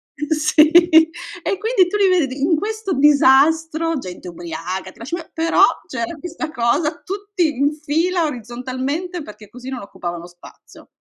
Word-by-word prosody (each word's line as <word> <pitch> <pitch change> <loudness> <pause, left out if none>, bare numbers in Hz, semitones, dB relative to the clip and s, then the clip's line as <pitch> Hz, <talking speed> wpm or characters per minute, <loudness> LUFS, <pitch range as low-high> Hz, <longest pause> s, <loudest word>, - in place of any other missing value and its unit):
Sì, 305 0 +3
e 340 +2 +3
quindi, 435 -4 +2
tu 415 - -1
li 395 -2 +4
vedi, 270 -2 -2
in 320 +3 +3
questo 435 0 -3
disastro, 310 +3 +3
gente 180 -5 -8
ubriaca, 175 +2 -6
ti - - -23
lascio 265 +9 -4
pe 330 -2 -11
però, 330 +1 +1 0.3
c'era 245 +5 -4
questa 320 -2 -6
cosa, 295 +4 0
tutti 390 -6 -2
in 285 +2 +1
fila, 325 +4 0
orizzontalmente, 260 - -4
perché 210 -2 -13
così, 250 +3 -10
non 255 -4 -5
occupavano 175 -3 -7
spazio. 175 0 -17
305 Hz, 145 wpm, -19 LUFS, 250-340 Hz, 0.3 s, li